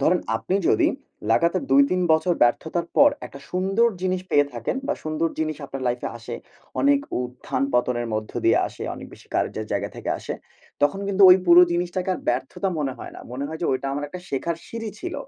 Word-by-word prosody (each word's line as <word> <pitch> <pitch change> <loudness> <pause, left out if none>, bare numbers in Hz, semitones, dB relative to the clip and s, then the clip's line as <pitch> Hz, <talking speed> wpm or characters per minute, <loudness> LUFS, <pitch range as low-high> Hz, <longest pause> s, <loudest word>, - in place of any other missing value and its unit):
ধরেন 175 +6 +3 0.2
আপনি 180 - -3
যদি, 385 -6 +4 0.4
লাগাতার 170 +9 +3
২-৩ 275 -10 +4
বছর 160 +3 +2
ব্যর্থতার 160 +8 +1
পর 285 +1 +7 0.2
একটা 140 - -12
সুন্দর 195 +6 +2
জিনিস 185 0 0
পেয়ে 145 0 +4
থাকেন - - -2
বা 295 - 0
সুন্দর 155 +1 0
জিনিস 155 -1 -1
আপনার 135 -1 -6
লাইফে 120 - -2
আসে। 120 +1 -7 0.5
অনেক 280 0 +4 0.2
উত্থান-পতনের 125 -1 -1
মধ্য 110 0 -4
দিয়ে - - +5
আসে, - - -10
অনেক - - -9
বেশি - - -15
কার্যের 110 - -1
জায়গা 100 0 -1
থেকে - - -4
আসে, - - -5 0.5
তখন 145 +7 +2
কিন্তু 200 0 +2
ওই 180 - +9
পুরো 175 +1 +9
জিনিসটাকে 180 +2 -1
আর - - -7
ব্যর্থতা 130 +10 -1
মনে 140 -3 -1
হয় - - -8
না। - - -9
মনে 135 +3 -3
হয় 160 +1 -6
যে - - +1
ওইটা 130 +1 -2
আমার 145 +1 -2
একটা 180 +5 -8
শেখার 160 +5 -2
সিঁড়ি 225 -1 -5
ছিল। 360 0 -5
165 Hz, 195 wpm, -24 LUFS, 135-185 Hz, 0.5 s, ওই